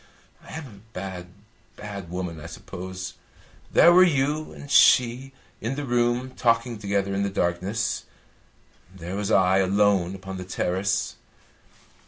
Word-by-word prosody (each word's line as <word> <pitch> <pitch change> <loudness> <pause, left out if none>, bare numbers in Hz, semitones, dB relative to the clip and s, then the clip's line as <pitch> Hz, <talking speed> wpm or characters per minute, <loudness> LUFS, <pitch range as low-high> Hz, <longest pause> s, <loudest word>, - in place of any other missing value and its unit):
I - - -12
am 160 -1 -6
a 105 -7 -13
bad, 90 -1 -6 0.5
bad 100 -4 -8
woman, 90 -2 -4
I 85 - -8
suppose. 95 +2 -7 0.6
There 170 - +7
were 185 +1 +8
you 150 -2 +1
and 145 - -10
she 125 +2 +5 0.3
in 115 +5 -2
the 145 0 -4
room 120 +1 +1
talking 115 -2 +1
together 100 -1 -1
in 100 - 0
the 100 - 0
darkness; 95 +3 -1 0.9
there 90 +1 -6
was 100 0 -2
I 95 -2 +4
alone 95 -1 +2
upon 95 0 -7
the 90 - -5
terrace. 95 +1 -1
100 Hz, 140 wpm, -25 LUFS, 95-120 Hz, 0.9 s, were